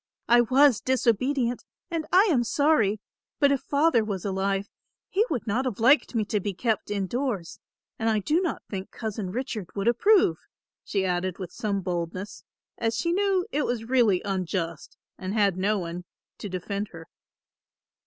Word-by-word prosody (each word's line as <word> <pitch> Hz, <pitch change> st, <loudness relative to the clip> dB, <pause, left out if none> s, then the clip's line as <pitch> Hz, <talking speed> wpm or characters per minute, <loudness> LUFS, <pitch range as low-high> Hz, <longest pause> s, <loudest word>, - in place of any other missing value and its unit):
I 240 Hz, +1 st, +6 dB
was 260 Hz, +1 st, +4 dB
disobedient 255 Hz, 0 st, +1 dB, 0.3 s
and 325 Hz, -2 st, -2 dB
I 375 Hz, +2 st, +7 dB
am 250 Hz, -6 st, +3 dB
sorry, 230 Hz, -6 st, +2 dB, 0.4 s
but 285 Hz, -1 st, +5 dB
if 275 Hz, -, +1 dB
Father 285 Hz, -5 st, +2 dB
was 200 Hz, -3 st, -4 dB
alive, 195 Hz, 0 st, -1 dB, 0.4 s
he 400 Hz, +3 st, +2 dB
would 245 Hz, -6 st, -2 dB
not 240 Hz, +4 st, 0 dB
have 240 Hz, -5 st, -3 dB
liked 260 Hz, +3 st, +4 dB
me 220 Hz, -2 st, +1 dB
to 210 Hz, 0 st, 0 dB
be 200 Hz, -1 st, -4 dB
kept 225 Hz, 0 st, -1 dB
in 200 Hz, -2 st, -1 dB
doors; 235 Hz, -6 st, -3 dB, 0.4 s
and 225 Hz, 0 st, +1 dB
I 220 Hz, -, +2 dB
do 300 Hz, -, +1 dB
not 355 Hz, -, -2 dB
think 195 Hz, -1 st, -6 dB
Cousin 215 Hz, -4 st, -5 dB
Richard 230 Hz, -5 st, -4 dB
would 200 Hz, +2 st, -2 dB
approve," 240 Hz, -, +4 dB, 0.4 s
she 195 Hz, -2 st, -1 dB
added 180 Hz, 0 st, -1 dB
with 185 Hz, -3 st, -7 dB
some 200 Hz, -3 st, -2 dB
boldness, 180 Hz, +2 st, -4 dB, 0.4 s
as 225 Hz, -1 st, 0 dB
she 335 Hz, +8 st, 0 dB
knew 385 Hz, -1 st, +1 dB
it 295 Hz, +1 st, 0 dB
was 240 Hz, -2 st, -2 dB
really 230 Hz, -7 st, +3 dB
unjust 180 Hz, -4 st, -3 dB, 0.2 s
and 190 Hz, +3 st, -4 dB
had 200 Hz, -4 st, +3 dB
no 200 Hz, +3 st, +1 dB
one 175 Hz, -1 st, -5 dB, 0.3 s
to 205 Hz, -, -6 dB
defend 200 Hz, +3 st, -3 dB
her. 165 Hz, -3 st, -12 dB
215 Hz, 170 wpm, -26 LUFS, 190-260 Hz, 0.4 s, I